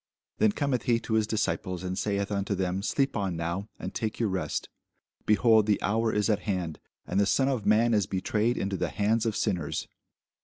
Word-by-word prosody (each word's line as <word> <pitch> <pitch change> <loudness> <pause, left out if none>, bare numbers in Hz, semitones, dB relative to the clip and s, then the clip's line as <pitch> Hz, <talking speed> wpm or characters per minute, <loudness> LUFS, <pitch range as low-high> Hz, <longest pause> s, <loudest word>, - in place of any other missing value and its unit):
Then 220 - +5
cometh 140 - -1
he 115 -1 +3
to 110 - -4
his 110 -1 +2
disciples, 95 -5 -2
and 90 0 -3
saith 100 +1 -1
unto 100 0 -1
them, 95 0 -1
Sleep 135 +6 0
on 95 -5 -1
now, 85 +5 -3
and - - -6
take 110 -1 -3
your 115 -3 +1
rest: 95 -1 -2 0.6
behold, 110 0 +5
the 105 - +3
hour 110 +2 +1
is 105 -1 +1
at 105 -3 +2
hand, 90 -5 -2 0.3
and 95 - 0
the 100 - +3
Son 135 +4 +3
of 130 -6 -1
man 115 +3 +4
is 105 -3 +2
betrayed 105 +5 0
into 95 0 -1
the - - -1
hands 110 +2 +1
of 110 - -1
sinners. 85 -6 -1
105 Hz, 200 wpm, -28 LUFS, 95-115 Hz, 0.6 s, Then